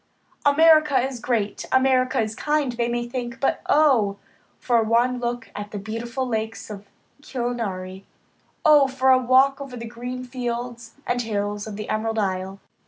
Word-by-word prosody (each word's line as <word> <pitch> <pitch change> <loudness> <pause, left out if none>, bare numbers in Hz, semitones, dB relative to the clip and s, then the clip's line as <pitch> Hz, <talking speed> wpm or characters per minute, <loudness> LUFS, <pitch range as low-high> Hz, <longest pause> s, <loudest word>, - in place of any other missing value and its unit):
America 310 -2 +5
is 260 0 -2
great, 230 -4 -2
America 260 -1 +3
is 215 -1 -1
kind, 295 +1 0
they 235 0 -1
may 240 0 -2
think, 240 0 -5
but 275 - 0
oh! 250 -10 +4 0.4
for 240 -2 +2
one 240 +3 +2
look 240 -3 -4
at 205 0 -6
the 210 - -6
beautiful 230 +5 -4
lakes 220 -1 -4
of 205 -1 -9 0.3
Killarney; 210 -8 -4 0.6
oh! 295 -3 +7
for 265 0 +2
a 260 - +6
walk 265 +2 +3
over 265 -3 -7
the 230 - -6
green 245 +2 -6
fields 240 -2 -5
and 245 0 0
hills 205 -2 -3
of 215 - -6
the 215 +1 -6
Emerald 225 +1 -2
Isle. 190 -1 -2
240 Hz, 160 wpm, -23 LUFS, 220-260 Hz, 0.6 s, oh